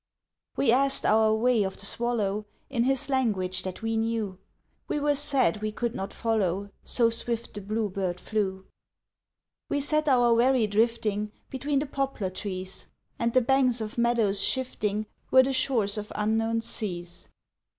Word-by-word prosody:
We 245 - +3
asked 270 +2 +2
our 220 0 +4
way 235 0 +3
of 190 -1 -2
the 200 - -3
swallow 210 -3 -1 0.2
In 240 -3 +1
his 270 +1 +1
language 215 -9 0
that 185 +4 -6
we 225 0 0
knew, 220 -4 -1 0.5
We - - -1
were 290 0 +2
sad 275 -6 +1
we 215 0 -1
could 235 +2 -2
not 195 +1 -4
follow 200 -3 -1
So 230 -2 +2
swift 230 0 -3
the 205 - -6
blue 215 +2 -1
bird 185 -2 -3
flew. 190 -3 -2 1.0
We 285 - +1
set 305 +2 +1
our 245 -3 +5
wherry 245 0 +4
drifting 210 -1 0 0.2
Between 275 +2 -1
the 285 - +1
poplar 270 -9 -2
trees, 185 -1 -5 0.3
And 235 0 +1
the 255 - +5
banks 255 -1 +3
of 220 +1 -4
meadows 230 -4 +2
shifting 215 -5 -1 0.2
Were 260 0 +7
the 270 +1 -1
shores 225 -6 +1
of 210 - -8
unknown 225 +2 +1
seas. 175 -6 -3
225 Hz, 160 wpm, -27 LUFS, 205-255 Hz, 1.0 s, Were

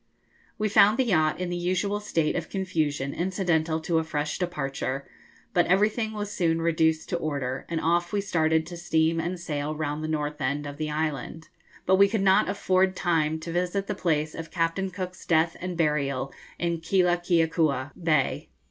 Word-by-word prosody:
We 215 - 0
found 210 +1 +5
the 260 - +2
yacht 160 -8 +2
in 180 -1 -2
the - - -1
usual 185 +4 0
state 165 -7 0
of 170 -2 -3
confusion 155 -8 -1
incidental 170 -3 0
to 165 0 +1
a - - -1
fresh 150 -1 -3
departure, 140 -6 -3 0.5
but 175 - +3
everything 215 +4 +2
was 210 -1 -4
soon 165 -4 +1
reduced 160 -1 +1
to 175 - 0
order, 140 -5 -3
and 165 -1 -1
off 175 +2 +1
we 205 - 0
started 160 -5 +1
to 175 +1 -8
steam 165 -1 +1
and 175 +2 -3
sail 150 -2 -3
round 150 0 -3
the - - -2
north 150 -1 -2
end 140 +3 -1
of 145 0 -7
the 155 0 -2
island, 155 +1 -3 0.4
but 190 +1 +4
we 200 0 +6
could 220 -2 0
not 190 -1 +4
afford 190 -1 +2
time 160 -3 +1
to 165 +1 -5
visit 180 +3 -1
the 205 - -2
place 155 -5 0
of 165 0 -7
Captain 170 +3 -1
Cook's 185 -1 -6
death 165 0 +2
and 180 -1 -4
burial 140 -4 0 0.2
in 170 -1 -1
Keelakeakua 165 -5 +2
Bay. 155 -5 +1
165 Hz, 180 wpm, -26 LUFS, 155-185 Hz, 0.5 s, we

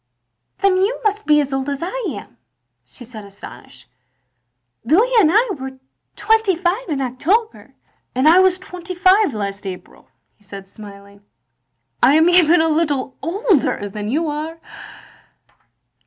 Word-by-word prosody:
Then 390 -1 +2
you 400 +6 0
must 425 0 -1
be 300 -1 +5
as 280 -1 -4
old 270 +1 -2
as 280 +2 -4
I 465 +7 -4
am," - - -12 0.5
she 245 - -14
said, 220 -3 -11
astonished. 195 -10 -13 1.0
"Louis 380 - +2
and 320 - +4
I 445 +5 +3
were 265 -1 -8 0.4
twenty 440 -3 +2
five 365 +6 -2
in 285 -3 -2
October. 350 - -2
" - - -42
" - - -49
I 310 +8 +5
was 375 -1 +3
twenty 365 -1 -9
five 370 - +3
last 200 -1 -5
April, 185 -1 -10
" - - -50
he 210 - -27
said 195 -1 -10
smiling. 200 0 -14 0.8
"I 280 - +5
am 320 +2 +4
even 350 -2 +5
a 325 - +2
little 295 -5 -1
older 335 - 0
than 210 +1 -6
you 310 +8 -1
are!" 305 +2 -5
310 Hz, 155 wpm, -19 LUFS, 245-375 Hz, 1.0 s, be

